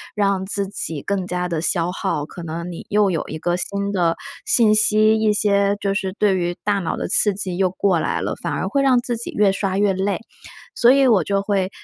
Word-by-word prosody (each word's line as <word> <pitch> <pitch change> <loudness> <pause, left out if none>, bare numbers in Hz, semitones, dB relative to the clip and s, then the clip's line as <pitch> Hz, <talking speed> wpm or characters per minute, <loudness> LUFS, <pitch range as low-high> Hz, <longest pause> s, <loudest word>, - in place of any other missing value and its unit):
让 200 -2 +1
自 200 0 -3
己 165 -7 -5
更 195 -2 -2
加 180 0 -2
地 165 -2 -2
消 175 0 0
耗， 180 -6 -2
可 175 - -10
能 170 +2 -5
你 170 - -9
又 205 -2 +2
有 165 - -1
一 155 - -5
个 175 +2 -1
新 200 +2 -3
的 175 -4 +1 0.3
信 220 -3 +4
息， 215 0 +4
一 215 -1 +3
些 200 -1 +2
就 195 -1 -1
是 190 -2 -2
对 205 -2 +2
于 175 -1 -1
大 205 -1 +1
脑 170 -4 -3
的 - - -3
刺 210 - +3
激 185 -3 -4
又 190 -1 +2
过 185 -2 +1
来 - - -1
了， - - -2
反 - - -3
而 - - -2
会 280 - 0
让 265 -2 +4
自 240 0 -3
己 235 - -6
越 205 -2 +3
刷 195 -1 -2
越 200 -1 +2
累。 190 0 -1 0.6
所 240 - +5
以 275 0 +4
我 200 -8 +4
就 200 -1 0
会 195 -2 0
195 Hz, 250 characters per minute, -21 LUFS, 180-205 Hz, 0.6 s, 所